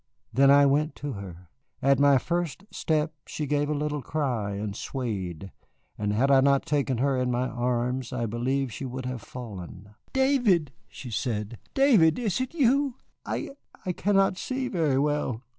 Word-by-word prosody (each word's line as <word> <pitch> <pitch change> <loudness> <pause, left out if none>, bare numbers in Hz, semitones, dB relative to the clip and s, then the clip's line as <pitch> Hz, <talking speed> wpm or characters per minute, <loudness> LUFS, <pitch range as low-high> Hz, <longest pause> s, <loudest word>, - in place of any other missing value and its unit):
Then 135 +3 +5
I 140 0 +7
went 150 +3 +2
to 145 - -5
her. 90 -4 -9 0.3
At 140 0 +3
my 140 -1 +6
first 170 +4 -2
step 155 0 0
she 150 - -3
gave 145 +1 0
a 150 - 0
little 150 0 -2
cry 125 -10 -2
and 100 0 -4
swayed, 95 - -4 0.4
and 105 -1 -1
had 130 +7 +2
I 135 -1 +6
not 140 0 +3
taken 140 -4 0
her 135 +2 +1
in 125 -1 0
my 125 +1 0
arms 125 +1 -1
I 125 -2 -2
believe 125 +3 -1
she 140 - -6
would 130 0 -5
have 125 -2 -4
fallen. 100 -4 -9 0.2
"David!" 245 - +3 0.2
she 125 - -9
said, 110 -1 -3 0.2
"David, 225 - +5
is 225 -2 -1
it 260 +6 -4
you? 275 -2 +3 0.3
I - - -3 0.3
I 185 - 0
cannot 195 0 +2
see 260 0 -2
very 155 -7 +1
well. 140 -4 0
135 Hz, 170 wpm, -27 LUFS, 120-155 Hz, 0.4 s, I